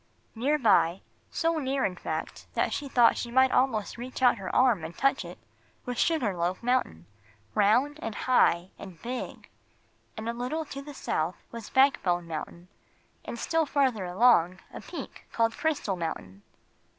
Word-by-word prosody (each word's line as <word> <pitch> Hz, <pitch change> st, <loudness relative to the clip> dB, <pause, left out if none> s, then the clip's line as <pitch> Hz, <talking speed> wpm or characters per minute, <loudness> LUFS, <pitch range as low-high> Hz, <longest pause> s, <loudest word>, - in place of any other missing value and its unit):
Near 275 Hz, +7 st, +1 dB
by 195 Hz, -, +3 dB, 0.3 s
so 330 Hz, -1 st, 0 dB
near, 270 Hz, -1 st, 0 dB
in 185 Hz, -, -2 dB
fact, -, -, -5 dB
that -, -, +1 dB
she 285 Hz, -1 st, -4 dB
thought 240 Hz, -3 st, +4 dB
she 240 Hz, -, -4 dB
might 260 Hz, +2 st, +4 dB
almost 235 Hz, -4 st, +1 dB
reach 255 Hz, +2 st, -6 dB
out 240 Hz, -3 st, +5 dB
her 190 Hz, -, -5 dB
arm 245 Hz, -9 st, +4 dB
and 165 Hz, +1 st, -7 dB
touch 275 Hz, -4 st, +2 dB
it 175 Hz, 0 st, -9 dB, 0.5 s
was 245 Hz, -1 st, -4 dB
Sugar 255 Hz, -, +1 dB
Loaf 175 Hz, +4 st, -2 dB
Mountain, 245 Hz, -, 0 dB, 0.5 s
round 250 Hz, -, +3 dB
and 225 Hz, -2 st, -4 dB
high 185 Hz, -8 st, +2 dB
and 185 Hz, -5 st, -10 dB
big. 250 Hz, +1 st, -6 dB, 0.7 s
And 220 Hz, +1 st, -5 dB
a 230 Hz, -, -1 dB
little 255 Hz, +7 st, -3 dB
to 275 Hz, -1 st, -7 dB
the 290 Hz, 0 st, -10 dB
south -, -, -2 dB, 0.2 s
was 230 Hz, -2 st, -8 dB
Backbone 185 Hz, -11 st, +2 dB
Mountain, 170 Hz, +2 st, -7 dB, 0.6 s
and -, -, -6 dB
still 325 Hz, +5 st, 0 dB
farther 260 Hz, -9 st, +1 dB
along 185 Hz, -2 st, +3 dB
a -, -, -7 dB
peak -, -, -9 dB
called 230 Hz, -1 st, +1 dB
Crystal 290 Hz, -11 st, -1 dB
Mountain. 155 Hz, -, -5 dB
235 Hz, 165 wpm, -28 LUFS, 185-265 Hz, 0.7 s, out